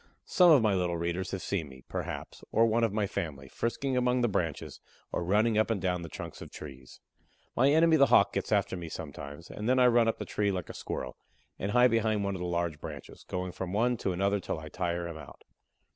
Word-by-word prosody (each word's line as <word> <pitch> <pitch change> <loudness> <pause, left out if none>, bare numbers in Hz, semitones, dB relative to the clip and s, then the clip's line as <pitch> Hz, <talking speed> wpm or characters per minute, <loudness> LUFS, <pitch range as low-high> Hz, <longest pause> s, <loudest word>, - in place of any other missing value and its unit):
Some 180 -1 +5
of 145 -8 +7
my 105 -2 +3
little 90 -2 0
readers 85 +2 -2
have 95 -1 -4
seen 85 -7 -2
me, 65 -1 -14
perhaps, - - -6
or 115 - +4
one 115 +1 +2
of 115 - +2
my 105 0 0
family, 75 -8 -4
frisking 130 - -2
among 125 0 +2
the 120 - +3
branches, 85 -8 -3 0.3
or - - -2
running 105 +4 +3
up 110 - +2
and 115 -3 0
down 90 -1 -1
the 85 - -7
trunks - - -8
of - - -8
trees. 65 -4 -11 0.6
My 135 +3 +4
enemy 160 +2 +5
the 140 -2 +6
Hawk - - +5
gets - - -3
after - - +2
me 85 -2 -6
sometimes, 75 +1 -8
and 105 +3 -3
then 130 - +4
I 125 - +6
run 120 -2 +5
up 115 - +1
the - - -5
tree 105 -1 0
"like 90 -2 -4
a - - -6
Squirrel," - - -5 0.4
and 100 - -2
hide 125 0 +6
behind 110 -2 +1
one 100 0 -1
of 95 - -5
the 90 - -2
large 85 -3 -1
branches, - - -9
going 90 0 -3
from 90 +1 -5
one 120 +4 +2
to 95 - -1
another 100 +3 +1
till 90 - -4
I 80 0 -8
tire 85 -1 -2
him 85 -2 -7
out. 80 - -12
100 Hz, 235 wpm, -30 LUFS, 85-115 Hz, 0.6 s, of